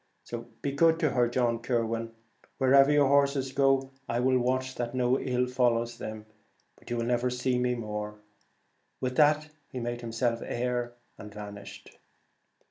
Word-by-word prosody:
Be 140 - 0
good 160 +3 +4
to 155 - +2
her, 120 -2 +3
John 120 -1 0
Kirwan, 115 -1 -1
and 115 0 -8 0.5
wherever 135 +1 +5
your 145 -1 +4
horses 140 -1 +2
go 135 0 +2 0.2
I 120 - 0
will 130 +1 +3
watch 130 +1 0
that 120 0 -4
no 125 +1 +2
ill 125 -1 0
follows 120 -2 0
them; 110 0 -6 0.5
but - - -16
you 120 - -1
will 115 - -1
never 120 +1 +1
see 125 0 0
me 125 0 +1
more.' 105 -2 -5 0.8
With 130 -1 -2
that 150 0 +4 0.2
he 130 - -5
made 120 0 -4
himself 115 0 -1
air, 120 0 -2 0.3
and 105 - -9
vanished. 100 -1 -10
125 Hz, 160 wpm, -29 LUFS, 115-135 Hz, 0.8 s, wherever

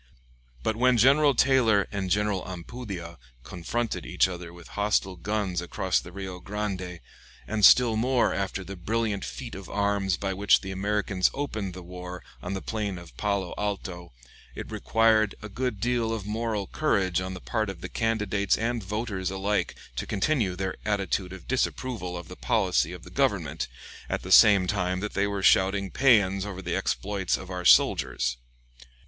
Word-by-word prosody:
But 110 - 0
when 125 +1 +3
General 140 +4 +5
Taylor 120 -6 +4
and 100 -2 -3
General 105 0 +1
Ampudia 90 -2 -7 0.2
confronted 105 - -3
each - - +2
other 90 -2 -7
with 85 -1 -13
hostile 105 -2 0
guns 95 -1 -2
across 90 +1 0
the 90 - -10
Rio 95 -1 -6
Grande, 95 -3 -4 0.5
and 110 -1 -2
still 120 +1 +7
more 125 +3 +2
after 95 0 -2
the 100 +2 -7
brilliant 105 +2 -1
feat 125 -3 -6
of 95 -3 -8
arms 100 -2 0
by 95 -1 -2
which 100 +1 +4
the 95 - -6
Americans 100 -1 +1
opened 110 -10 -3
the 90 - -8
war 90 0 -8 0.2
on 95 - -4
the 95 - -5
plain 105 -4 -3
of 85 -2 -12
Palo 100 -3 -1
Alto, 95 -4 -4 0.4
it - - -7
required 110 -2 +2
a 110 - -6
good 120 0 -3
deal 120 0 0
of 110 -3 -3
moral 110 -1 -2
courage 95 - +1
on 95 0 -4
the - - -7
part 110 +2 -2
of 90 -4 -7
the - - -4
candidates 105 -3 0
and 115 0 -1
voters 100 -2 -3
alike 95 +2 -1 0.2
to - - -3
continue 105 -4 0
their 95 0 -3
attitude 100 -3 -1
of 95 -1 -10
disapproval 120 -7 -2
of 85 - -8
the - - -9
policy - - +1
of - - -9
the - - -12
Government, - - 0 0.4
at - - -2
the - - -6
same 100 -3 +8
time 90 -1 -1
that 105 +2 -4
they 100 +1 +1
were 100 -1 -3
shouting 95 0 +3
paeans 100 -8 +4
over 95 -2 -6
the 85 0 -2
exploits 100 -3 -1
of 95 0 -9
our 90 -1 -4
soldiers. - - +4
100 Hz, 170 wpm, -27 LUFS, 95-110 Hz, 0.5 s, same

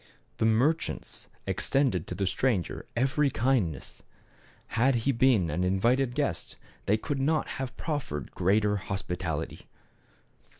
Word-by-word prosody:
The 110 - +2
merchants 130 +9 0 0.2
extended 125 - +1
to'the 100 - -2
stran 95 +1 +1
ger - - -8
every 135 +4 +2
kindness. 110 - -1 0.7
Had 125 +3 +3
he 140 - +4
been 115 - +3
an 90 +5 0
invited 120 +7 +2
guest - - -1 0.3
they 105 - +4
could 140 +5 -3
not 150 +3 +1
have 130 0 -5
proffered 130 - -3
greater 105 +3 +2
hos 95 0 -4
pitality. 85 -3 -4
115 Hz, 125 wpm, -28 LUFS, 95-135 Hz, 0.7 s, he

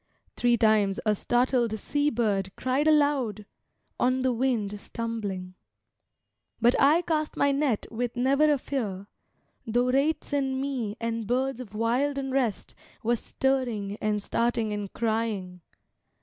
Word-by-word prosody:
Three 240 -1 +3
times 215 -3 +3
a 215 - +4
startled 240 0 +1
sea 290 +7 0
bird 210 -6 0
cried 260 +4 0
aloud, 285 -9 +2 0.5
On 255 +1 +2
the 260 -1 +2
wind 225 -5 -1
stumbling. 205 -5 -4 1.1
But 240 +1 +4
I 310 +5 +5
cast 310 -2 -1
my 280 - +3
net 275 -6 0
with 240 +1 -3
never 275 +5 +3
a 290 - +3
fear, 210 -9 -4 0.6
tho 245 +3 +2
wraiths 285 +3 0
in 270 -2 0
me 250 -6 -3
And 230 -2 -3
birds 255 +1 0
of 215 -5 -9
wild 250 +6 +1
unrest 265 -5 -1 0.3
were 235 +2 +2
stirring 240 -6 -1
and 210 -1 0
starting 230 -1 0
and 205 -2 -4
crying. 215 -6 -2
240 Hz, 135 wpm, -27 LUFS, 215-270 Hz, 1.1 s, I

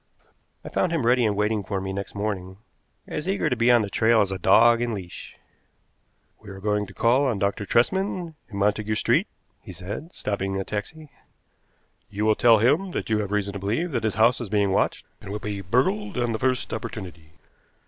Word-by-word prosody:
I - - -6
found 180 - 0
him 160 -8 0
ready 125 +1 +4
and 105 - 0
waiting 105 +1 0
for 100 0 -3
me 95 0 -4
next 100 +1 -6
morning, 95 -3 -4 0.5
as 150 +5 -4
eager 195 -7 0
to - - +2
be 115 +1 +2
on 120 -2 +5
the 100 - -4
trail 110 0 +3
as 100 -2 0
a 95 - -4
dog 115 +6 +5
in 120 -2 -1
leash. 90 -3 -9 1.0
"We 105 - -12
are 95 0 -9
going 105 0 -1
to 95 - -13
call 130 +5 +3
on 120 -5 0
Dr. 100 +2 -1
Tresman, 180 - 0 0.2
in 100 - -7
Montagu 105 +2 0
Street," - - +2 0.3
he - - -10
said, 100 - -7
stopping 95 - -3
a - - -2
taxi. 145 +10 -6 1.0
"You 105 +1 -2
will 110 - +5
tell 115 +1 +5
him 145 - +2
that - - -4
you 110 - +2
have 105 -2 -3
reason 100 -1 -1
to 100 - -5
believe 115 - -1
that 120 -5 -2
his 110 -4 0
house 115 +4 +3
is 115 - -5
being 100 -1 +1
watched, - - 0 0.2
and 95 - -8
will 105 - -3
be 105 -2 -5
burgled 190 - 0
on 120 -1 0
the 110 - -2
first 130 -1 0
opportunity. 85 -7 -7
110 Hz, 210 wpm, -24 LUFS, 100-120 Hz, 1.0 s, on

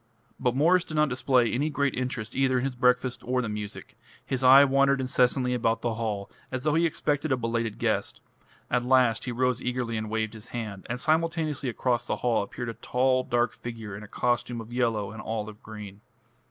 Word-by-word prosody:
But 125 -1 +1
Mwres 170 +6 +4
did 155 - -7
not 150 -1 +3
display 125 -1 +2
any 145 +5 0
great 140 -3 0
interest 125 -3 -4
either 130 -1 +2
in 125 - 0
his 135 -1 -1
breakfast 125 0 +1
or 125 +1 0
the 120 - -1
music; 105 -1 -6 0.3
his 130 0 -2
eye 135 +2 +9
wandered 140 0 +3
incessantly 125 0 +2
about 115 -2 0
the 120 -1 0
hall, 105 -3 -3 0.2
as 130 -1 -3
though 150 0 +2
he 165 +2 +3
expected 150 -1 -1
a 130 - +3
belated 115 -2 -2
guest. - - -1 0.5
At 125 - +2
last 125 -3 +3
he 125 - -2
rose 125 +1 0
eagerly 125 -2 -2
and 110 0 -4
waved 110 0 -1
his 110 +1 -9
hand, 110 -6 -6
and 125 +1 -2
simultaneously 155 -3 0
across 120 0 -1
the - - 0
hall 120 -3 +3
appeared 120 +4 -5
a - - -4
tall 130 +2 +1
dark 120 -1 +1
figure 115 -4 -7
in 100 - -8
a 105 - -10
costume 120 +1 -1
of 115 +1 -9
yellow 115 -5 0
and 110 0 -8
olive 110 -1 -5
green. 105 -2 -10
125 Hz, 205 wpm, -27 LUFS, 115-130 Hz, 0.5 s, eye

